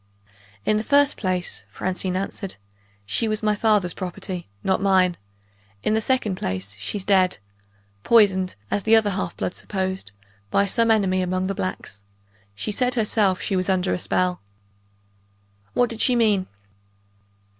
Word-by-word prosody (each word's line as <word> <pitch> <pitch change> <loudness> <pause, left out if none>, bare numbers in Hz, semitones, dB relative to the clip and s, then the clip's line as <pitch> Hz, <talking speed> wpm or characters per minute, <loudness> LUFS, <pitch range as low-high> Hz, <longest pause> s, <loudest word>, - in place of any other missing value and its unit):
"In 215 - +3
the 215 - -1
first 285 +3 +4
place," 185 -3 -2
Francine 185 0 -2
answered, 195 0 -4 0.5
"she 110 - 0
was 215 0 -1
my 210 0 +3
father's 205 -5 +2
property, 180 - -6
not 190 0 +1
mine. 185 -3 +3 0.7
In - - +1
the 220 - +2
second 220 -6 0
place, 95 - -4
she's 190 - -4
dead. 185 -2 +3 0.7
Poisoned, 195 -5 +4 0.2
as 205 - +1
the 220 +3 +5
other 215 -2 +3
half 190 0 -3
bloods 180 - -3
supposed, 190 - -3 0.4
by 200 - +3
some 230 +3 +2
enemy 195 -4 +3
among 185 +1 -1
the 195 - -1
blacks. 95 - -5 0.5
She 160 - -3
said 250 +4 +1
herself, 210 -4 +2
she 195 - -1
was 185 +1 0
under 185 0 +1
a - - -1
spell!" 180 -3 0 1.3
"What 245 - +4
did 230 - -4
she 250 - +3
mean?" 210 -5 +2
195 Hz, 150 wpm, -23 LUFS, 185-215 Hz, 1.3 s, the